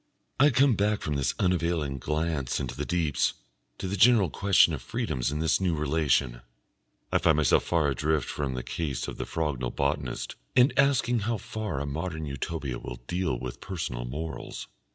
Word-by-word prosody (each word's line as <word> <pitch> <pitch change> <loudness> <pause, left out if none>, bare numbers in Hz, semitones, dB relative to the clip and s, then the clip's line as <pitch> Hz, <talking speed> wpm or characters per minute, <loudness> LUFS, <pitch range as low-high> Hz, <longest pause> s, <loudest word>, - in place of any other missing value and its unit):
I 145 +2 +7
come 135 0 +4
back 105 0 +1
from 75 - -1
this 70 -2 0
unavailing 85 -6 0
glance 75 -1 -1
into 60 -3 -4
the - - -4
deeps 80 -6 +1 0.4
to - - -4
the 95 - -2
general 105 -4 +5
question 95 -4 +4
of 70 - -4
freedoms 60 +1 -2
in 75 - -2
this 80 +3 +1
new 90 -3 +1
relation. 70 -5 +1 0.7
I - - +3
find 80 - +4
myself 75 -4 +4
far 85 -4 +2
adrift 75 +2 0
from 70 -3 -3
the 65 - -4
case 70 -7 -3
of - - -6
the - - -4
Frognal 75 -6 -2
botanist, 70 -2 -2 0.2
and 125 +2 +5
asking 135 -3 +3
how 110 +2 -1
far 105 -6 -4
a 70 - -2
modern 80 +2 -4
Utopia 70 -2 -4
will - - -8
deal 90 -5 -1
with 60 0 -7
personal 65 -10 -4
morals. 80 +6 -6
80 Hz, 175 wpm, -28 LUFS, 70-90 Hz, 0.7 s, I